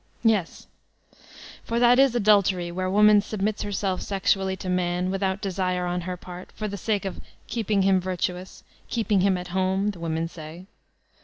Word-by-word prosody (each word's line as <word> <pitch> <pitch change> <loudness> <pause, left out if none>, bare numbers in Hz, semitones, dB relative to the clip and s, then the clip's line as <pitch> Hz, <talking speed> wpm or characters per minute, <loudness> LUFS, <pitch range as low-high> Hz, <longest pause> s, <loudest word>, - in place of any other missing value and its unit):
Yes, 215 -7 +1 1.0
for 230 - -2
that 245 +1 +5
is 270 -3 +4
adultery 200 -5 +3
where 185 +1 -2
woman 210 +1 +6
subnuts 210 0 -2
herself 195 -2 -2
sexually 195 -1 0
to 190 - -7
man, 180 0 0
without 195 0 -1
desire 185 -2 -1
on 180 0 -2
her 180 +1 -5
part, 180 0 -10
for 215 - -4
the 200 - -5
sake 205 +1 -1
of 190 - -5 0.3
'Iceeping 210 -4 0
him 190 -1 +3
virtuous," 185 0 -4 0.3
"keeping 215 -4 +1
him 190 -1 +3
at 180 0 -7
home," 190 +2 0
the 185 - -12
women 165 0 -2
say. 165 +1 -10
190 Hz, 165 wpm, -25 LUFS, 180-205 Hz, 1.0 s, woman